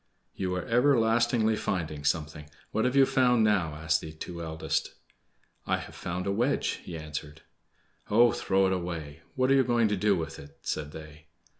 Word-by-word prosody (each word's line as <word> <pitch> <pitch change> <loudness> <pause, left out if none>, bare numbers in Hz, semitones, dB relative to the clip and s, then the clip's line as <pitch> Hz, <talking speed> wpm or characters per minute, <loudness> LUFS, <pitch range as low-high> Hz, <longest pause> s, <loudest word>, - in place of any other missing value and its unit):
"You 90 -1 -2
are 90 - -3
everlastingly 120 -3 +3
finding 80 -8 -3
something! 75 0 -2 0.2
What 110 - 0
have 125 +1 +1
you 135 -1 +7
found 125 -3 +3
now?" 95 -8 +2
asked 80 +1 0
the 80 - -7
two 85 +2 -7
eldest. 80 -1 -2 0.7
"I - - +2
have - - -9
found 90 +1 -4
a 100 - 0
wedge," 120 +8 0
he 85 - -7
answered. 75 0 -7 0.7
"Oh, 115 +3 +5
throw 95 0 +1
it 95 - +2
away! 85 -4 -5 0.2
What 130 0 +2
are - - +6
you 135 - +5
going 120 -3 +2
to 105 - +1
do 100 +1 +2
with 80 -3 -5
it?" 70 0 -13
said 75 -1 -3
they. 75 0 -11
90 Hz, 180 wpm, -28 LUFS, 80-115 Hz, 0.7 s, you